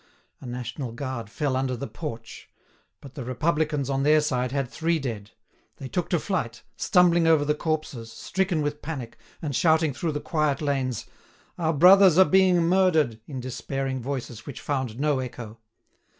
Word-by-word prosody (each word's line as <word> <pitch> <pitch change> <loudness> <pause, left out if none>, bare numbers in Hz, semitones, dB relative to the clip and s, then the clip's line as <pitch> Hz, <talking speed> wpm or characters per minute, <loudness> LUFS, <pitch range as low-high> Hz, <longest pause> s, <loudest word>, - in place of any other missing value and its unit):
A 130 - -10
national 125 0 -5
guard 130 -4 -5
fell 140 +2 -1
under 130 -1 -1
the 140 - -4
porch. 115 -8 -8 0.5
But 140 -2 -12
the 135 - -6
Republicans, 150 +2 0
on 135 -1 0
their 150 +2 +5
side, 125 -4 -1
had 135 -1 -1
three 165 +6 0
dead. 115 -8 -5 0.5
They 135 - -7
took 175 +5 -2
to 175 - +2
flight, 150 - -3
stumbling 175 -4 +3
over 160 -3 +4
the 150 - +2
corpses, 150 -7 -3
stricken 175 - -1
with 145 0 -3
panic, 135 -7 -6 0.2
and 145 -4 -2
shouting 160 -1 +3
through 160 +4 -2
the 145 - -2
quiet 150 -3 0
lanes: 135 -5 -1 0.5
"Our 165 -1 +1
brothers 180 +3 +7
are 190 - +8
being 185 -2 +4
murdered!" 165 -10 +2
in 135 -4 -6
despairing 130 +1 -4
voices 125 -3 -5
which 140 - -7
found 130 -5 -3
no 145 -2 +1
echo. 120 -3 -7
140 Hz, 165 wpm, -25 LUFS, 125-160 Hz, 0.5 s, are